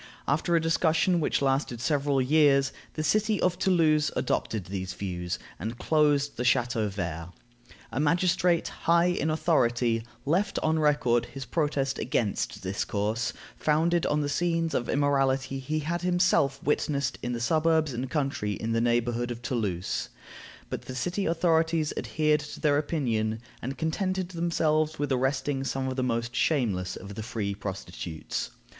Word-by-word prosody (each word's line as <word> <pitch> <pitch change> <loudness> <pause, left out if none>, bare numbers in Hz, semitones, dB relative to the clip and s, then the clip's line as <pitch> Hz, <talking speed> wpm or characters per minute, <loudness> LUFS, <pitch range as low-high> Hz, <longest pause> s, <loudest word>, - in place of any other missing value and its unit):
After 155 +4 +1
a - - +5
discussion 165 +2 +2
which 150 - 0
lasted 135 -3 0
several 140 +1 +1
years, 140 0 +4 0.2
the 155 - -2
city 215 +4 +2
of 180 -1 +1
Toulouse 155 -5 +3
adopted 110 -6 -1
these 95 0 -5
views, 90 -3 -3 0.2
and 110 +7 -4
closed 145 -2 +2
the 120 - -1
Chateau 120 -4 +2
vert. 85 -4 -4 0.6
A - - -2
magistrate, 175 +2 +2
high 170 +1 +2
in 175 -3 +1
authority, 120 -8 +2 0.2
left 175 +8 +1
on 155 0 +2
record 125 -6 +2
his 135 -1 -7
protest 140 0 -1
against 115 -7 -1
this 95 +2 -1
course, 110 +3 -1 0.2
founded 165 +3 +2
on 150 0 +1
the 145 - -1
scenes 165 +1 0
of 120 - -1
immorality 135 -1 +1
he 150 +4 -2
had 170 +3 -2
himself 175 -6 +2
witnessed 140 -2 0
in 125 - -2
the 120 - -3
suburbs, 155 +3 +2
and 120 +2 -3
the - - -7
country 135 -7 -1
in 110 +3 -3
the 115 0 +1
neighborhood 120 0 +1
of 120 0 -6
Toulouse; 105 -7 -2 0.6
but - - -3
the 130 - -7
city 180 +10 -1
authorities 165 -2 +2
adhered 150 -1 +1
to 150 0 -8
their 145 -2 +3
opinion, 115 -8 -1 0.2
and 135 +3 -4
contented 185 +3 -1
themselves 160 -3 +1
with 145 -1 -2
arresting 135 +1 0
some 135 0 -2
of 130 - -3
the 130 - -1
most 120 -1 -1
shameless 110 - +1
of 100 +2 -8
the 110 - -5
free 110 -3 -3
prostitutes. 95 -4 -5
140 Hz, 155 wpm, -28 LUFS, 120-160 Hz, 0.6 s, a